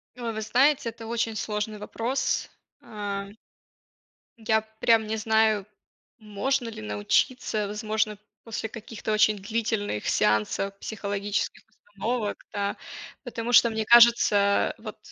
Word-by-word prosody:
Э, 240 -2 -4
вы 220 -1 -4
знаете, 255 +3 +3
это 230 0 -10
очень 230 -1 -1
сложный 210 0 -3
вопрос. 230 +5 -2 0.3
А 205 -3 -5 1.1
Я 220 -1 +2 0.2
прям 225 -2 +4
не 220 +1 -2
знаю, 220 -2 +2 0.5
можно 235 +4 -2
ли 225 - -8
научиться, 200 - 0
возможно, 215 0 -1 0.3
после 225 -1 -4
каких-то 220 -1 -5
очень 215 0 +4
длительных 210 - -2
сеансов 105 - +1
психологических 205 -1 -3
установок, 215 +1 -4
да. 200 -1 -2 0.5
Потому 240 -1 -4
что, 235 0 +7
мне 220 -1 -2
кажется, 230 -4 +5
вот - - -9
220 Hz, 115 wpm, -26 LUFS, 205-230 Hz, 1.1 s, что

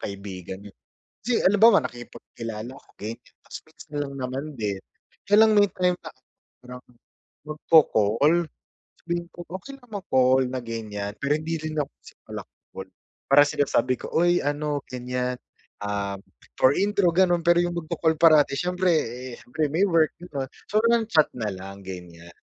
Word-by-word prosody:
Kaibigan 95 -2 -7
'yun. - - -32 0.5
Kasi 235 +2 +1
halimbawa, 205 -1 +6
nakipagkilala 120 -2 -7
ko - - -25
ganyan, 115 +3 -9
'tas - - -9
minsan 150 - -15
lang 140 -1 -6
naman 130 +1 -4
din. 105 -5 -3 0.5
Kaya 205 +1 +4
lang 220 - +6
may 205 - +6
time 180 -1 +1
na 155 - -10 0.6
ano 125 - -8 0.7
magko-call, 155 0 +3 0.6
sabihin 170 0 -3
ko - - -24 0.2
okey 275 +8 -11
lang 245 -3 -22
mag 200 -2 -6
call 130 0 +4
na 130 0 -3
ganyan, 105 -3 -5
pero 140 +1 +1
hindi 165 +1 -3
rin 155 0 -5
ako 140 - -3 0.4
pala-call, - - -10 0.4
para 145 +1 +8
sinasabi 130 -3 +1
ko, - - -6
"Uy 175 +1 +3
ano 145 0 -1
ganyan, 125 0 -3 0.5
ah" 100 -1 -2 0.4
for 130 - +5
intro 200 -2 +2
ganon, 175 -2 +3
pero 175 0 +5
yung 175 0 -2
magko-call 160 0 0
parati, 155 -4 +5
syempre 180 0 0
eh, 125 -3 -3
syempre 155 +4 -2
may 185 +5 +3
work 165 -3 +3
ganun, 140 -7 -5 0.2
so 210 - +3
nang-chat 220 -10 +3
nalang, 100 -2 -5
ganyan. 85 -2 -10
145 Hz, 150 wpm, -25 LUFS, 115-175 Hz, 0.7 s, para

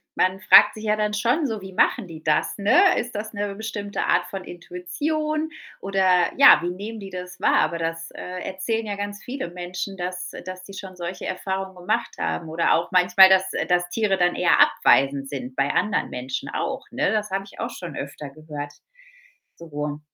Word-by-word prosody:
man 185 +1 +1
fragt 210 - +7
sich 215 - -9
ja 210 0 +2
dann 210 0 -1
schon 250 +8 +1
so: 220 -2 -3
„Wie 190 -1 -9
machen 200 +1 +2
die 160 -1 -11
das“, 150 -1 +1
ne? 365 - +4
Ist 240 -2 -5
das 215 +2 -5
'ne 205 -1 -3
bestimmte 205 -2 -4
Art 180 0 +2
von 190 0 -6
Intuition 305 - -3 0.3
oder 190 -2 +2
ja, 280 - +9
wie 175 - -1
nehmen 210 +5 -6
die 195 -1 -8
das 180 0 -8
wahr? - - +3
Aber 170 -1 -1
das, 165 0 -4
äh, 180 0 -7
erzählen 220 +4 -2
ja 205 - -3
ganz 205 +1 -6
viele 255 -7 -5
Menschen, 180 +2 -6
dass 180 0 -4 0.2
dass 185 0 -8
sie 195 - -11
schon 190 -2 -9
solche 180 +1 -6
Erfahrungen 190 0 -4
gemacht 180 0 -2
haben 165 - -2
oder 165 +1 +2
auch 170 +1 -2
manchmal, 180 +1 +7
dass 190 0 +3
äh, - - -1
dass 175 0 +1
Tiere 200 0 +1
dann 175 -1 +2
eher - - +3
abweisend 135 0 +3
sind 130 -2 -6
bei 140 +1 +1
anderen 210 -2 0
Menschen 130 +1 -4
auch, - - -3
ne? - - 0
Das 210 -2 -1
habe 195 0 -2
ich 200 - -15
auch - - -3
schon 170 -6 -8
öfter 140 +1 -6
gehört 145 0 -8 0.8
so. 150 -2 -5
185 Hz, 195 wpm, -23 LUFS, 175-205 Hz, 0.8 s, ja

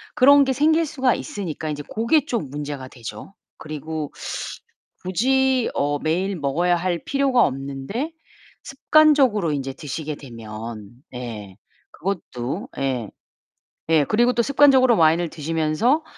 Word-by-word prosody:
그런 280 +2 +7
게 270 - 0
생길 315 +4 +3
수가 260 -4 +1
있으니까 160 -6 -5
인제 145 -1 -4
그게 235 +7 +2
좀 220 - -3
문제가 145 -2 -5
되죠. 115 - -9 0.2
그리고 155 0 -5 0.9
굳이 260 +6 +2
어 145 +1 0
매일 185 +6 -1
먹어야 165 +5 +1
할 175 0 -1
필요가 275 -3 +3
없는데 140 - -4 0.5
습관적으로 275 - +3
인제 135 -2 -3
드시게 150 +2 -5
되면 115 -4 -8 0.2
네 110 -6 -7 0.4
그것도 170 - -4
예. 125 -6 -2 0.8
예 155 -3 +4
그리고 240 - +3
또 240 - +2
습관적으로 265 -2 +5
와인을 165 +1 +3
드시면서 160 - 0
165 Hz, 270 characters per minute, -22 LUFS, -, 0.9 s, 그런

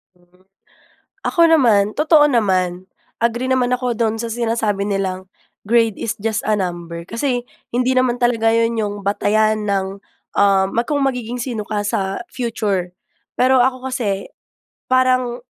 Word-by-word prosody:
Mm, 175 0 -30 0.9
ako 340 - +1
naman 240 -11 +5
totoo 305 0 +5
naman, 185 -7 0 0.3
agree 240 +2 0
naman 255 -1 +1
ako 250 -1 0
do'n 225 -1 0
sa 235 - -3
sinasabi 225 -3 -1
nilang, 190 -2 -3 0.4
grade 225 -1 +2
is 225 - -2
just 220 0 -1
a 215 - +2
number. 175 -3 -4
Kasi 245 +1 -1 0.3
hindi 255 +1 +1
naman 245 -1 +2
talaga 230 -2 +2
yun 230 0 +1
yung 205 -2 -1
batayan 215 +2 +1
ng, 195 -1 -1 0.4
uhm, 195 0 +3
kung 290 -1 -1
magiging 250 -3 -2
sino 230 -4 -4
ka 210 -1 -2
sa, 195 - -2
future. 205 -7 -2 0.5
Pero 260 +1 +4
ako 260 0 -1
kasi, 205 -7 -2 0.6
parang, 255 -1 +1
225 Hz, 140 wpm, -19 LUFS, 200-250 Hz, 0.9 s, naman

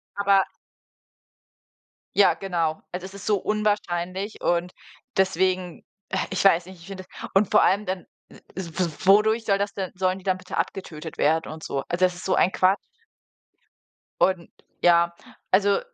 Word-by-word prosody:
aber 200 -1 +4 1.7
Ja, 200 - +6
genau. 170 -5 -2
Also 180 +1 -5
es 190 - -10
ist 200 - -10
so 210 -2 +3
unwahrscheinlich 205 -2 -2
und 175 +1 0 0.5
deswegen, 185 -1 +1 0.3
äh, 190 - -1
ich 190 - 0
weiß 175 -3 +5
nicht 185 -2 -12
ich 170 - -13
finde 190 -1 -7
das - - -8
und 195 0 +3
vor - - +6
allem 200 +2 +2
dann, 185 -1 -4 0.2
w - - -15 0.2
w 170 -2 -2
wodurch 220 +3 +5
soll 195 -2 +3
das 200 0 -2
denn 190 -2 -4
sollen 185 0 0
die 190 - -13
dann 185 -1 +1
bitte 185 0 -7
abgetötet 165 -2 -4
werden 160 +2 +1
und 160 0 -9
so? 135 - -3
Also, 180 +2 +2
das 180 -1 -1
ist 180 - -9
so 185 - +2
ein 185 - +3
Quatsch. 190 +2 +3 1.4
Und 185 -3 +2 0.3
ja, 170 0 +4 0.4
also 200 +1 +4
185 Hz, 165 wpm, -25 LUFS, 175-195 Hz, 1.7 s, Ja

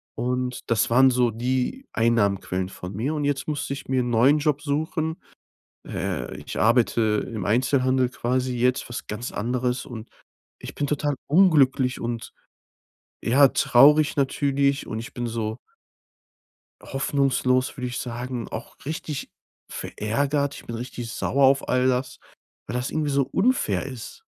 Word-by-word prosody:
Und 125 +1 -2
das 110 -2 +2
waren 130 +3 +6
so 125 -1 +3
die 130 - -2
Einnahmequellen 100 -5 +1
von 90 0 -8
mir. 130 +9 -1
Und 145 - -1
jetzt 140 -1 -1
musste 145 -2 -2
ich 135 - -8
mir 130 -1 +2
'n 120 - -3
neuen 130 +6 +4
Job 145 -1 0
suchen. 160 +3 -2 0.7
Äh, 65 - -3
ich - - -6
arbeite 110 -2 +2
im 105 -5 -4
Einzelhandel 130 +3 +2
quasi 125 0 -1
jetzt, 125 +2 +1
was 120 - -6
ganz 105 +4 -5
anderes. 125 +2 -1
Und 115 -2 -8 0.5
ich - - -9
bin 145 - -1
total 145 0 0
unglücklich 140 -7 +4
und, 115 -1 -4 0.9
ja, 135 +3 +5
traurig 145 +6 +5
natürlich 140 0 +1
und 110 - -4
ich 115 - -8
bin 120 -1 -3
so 110 0 -3 1.2
hoffnungslos, 135 -2 0
würde 125 -1 -3
ich 125 - -4
sagen, 120 -1 -5
auch 110 - -7
richtig 155 -1 -5 0.4
verärgert. 140 +6 -1
Ich - - -11
bin 115 - -5
richtig 120 -1 -6
sauer 135 +2 +2
auf 135 +1 +3
all 125 0 +3
das, 130 0 -1 0.5
weil 110 - -4
das 125 +1 -1
irgendwie 155 -2 -1
so 140 0 +3
unfair 190 - +1
ist. 130 - -9
125 Hz, 150 wpm, -24 LUFS, 120-140 Hz, 1.2 s, waren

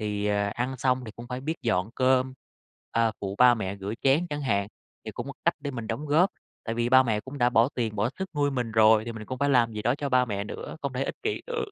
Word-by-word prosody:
Thì, 105 -1 -2
ờ, 100 0 +1
ăn 125 +2 -2
xong 130 0 +1
thì 110 - -7
cũng 120 +2 -10
phải 125 0 -4
biết 160 +4 -3
dọn 105 -2 0
cơm, 130 0 +2 0.6
ờ, 115 -1 +2
phụ 100 -1 -3
ba 125 -1 +7
mẹ 100 -3 -4
rửa 100 +2 -5
chén 140 +6 +3
chẳng 145 0 -3
hạn, 100 -5 0 0.4
thì 110 - -5
cũng 120 +3 -6
một 140 - -7
cách 170 - +3
để 145 -1 -4
mình 115 -4 -6
đóng 140 +8 -4
góp, 165 +7 +4 0.3
tại 115 - -3
vì 120 0 0
ba 130 +1 +7
mẹ 110 -4 0
cũng 135 +4 -9
đã 120 -1 +3
bỏ 120 +1 +4
tiền, 110 -4 -2
bỏ 105 +4 +1
sức 190 0 -4
nuôi 145 -1 +2
mình 125 -4 -2
rồi 110 0 +5
thì 120 - -5
mình 110 -1 -8
cũng 130 - -5
phải 140 0 +1
làm 120 -4 +3
gì 105 - -5
đó 120 - +2
cho 145 0 -3
ba 125 -1 +4
mẹ 100 -3 -3
nữa, 105 - -7
không 140 -2 -2
thể 130 +2 -1
ích - - -4
kỷ 430 0 -2
được, 480 -2 -2
120 Hz, 280 wpm, -27 LUFS, 110-135 Hz, 0.6 s, ba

